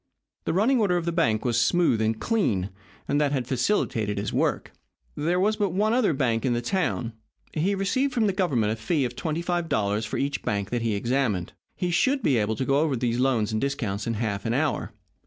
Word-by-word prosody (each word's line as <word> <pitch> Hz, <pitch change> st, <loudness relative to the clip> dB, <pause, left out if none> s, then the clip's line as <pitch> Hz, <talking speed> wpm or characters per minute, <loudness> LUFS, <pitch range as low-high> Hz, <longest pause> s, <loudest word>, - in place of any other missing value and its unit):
The -, -, 0 dB
running 230 Hz, +8 st, +3 dB
order 190 Hz, -5 st, +2 dB
of 170 Hz, -, -2 dB
the 170 Hz, -, 0 dB
bank 120 Hz, -11 st, +1 dB
was 120 Hz, -1 st, +2 dB
smooth 170 Hz, -10 st, +2 dB
and 110 Hz, 0 st, 0 dB
clean, 105 Hz, -, 0 dB, 0.4 s
and 145 Hz, +1 st, +1 dB
that 145 Hz, -2 st, +2 dB
had 130 Hz, -4 st, -1 dB
facilitated 120 Hz, -, 0 dB
his 100 Hz, +1 st, -3 dB
work. -, -, 0 dB, 0.4 s
There 170 Hz, +5 st, 0 dB
was 210 Hz, +3 st, +2 dB
but 200 Hz, -4 st, 0 dB
one 215 Hz, +4 st, +2 dB
other 240 Hz, -7 st, +3 dB
bank 120 Hz, -6 st, 0 dB
in 130 Hz, -, +1 dB
the 120 Hz, -, 0 dB
town. 120 Hz, -, -1 dB, 0.4 s
He 185 Hz, +6 st, +1 dB
received 255 Hz, +9 st, 0 dB
from 235 Hz, -3 st, +1 dB
the 200 Hz, -, +1 dB
Government 135 Hz, -, +1 dB
a -, -, -6 dB
fee 135 Hz, +5 st, 0 dB
of 125 Hz, 0 st, -5 dB
twenty 160 Hz, +4 st, -2 dB
five 175 Hz, -1 st, -1 dB
dollars 105 Hz, +1 st, 0 dB
for -, -, -3 dB
each 140 Hz, +1 st, -1 dB
bank 100 Hz, -2 st, -2 dB
that 120 Hz, -1 st, 0 dB
he 115 Hz, -2 st, 0 dB
examined. 115 Hz, -4 st, -1 dB, 0.2 s
He 180 Hz, -1 st, -2 dB
should 270 Hz, +8 st, +2 dB
be 135 Hz, -, +3 dB
able 110 Hz, 0 st, 0 dB
to 130 Hz, -, -2 dB
go 140 Hz, +2 st, +2 dB
over 150 Hz, -3 st, +1 dB
those 120 Hz, 0 st, -1 dB
loans 125 Hz, -5 st, +1 dB
and 110 Hz, -, -1 dB
discounts 115 Hz, -8 st, -2 dB
in 115 Hz, -, -1 dB
half 105 Hz, -2 st, -2 dB
an 115 Hz, +1 st, -1 dB
hour. 150 Hz, +1 st, -1 dB
135 Hz, 225 wpm, -26 LUFS, 110-175 Hz, 0.4 s, running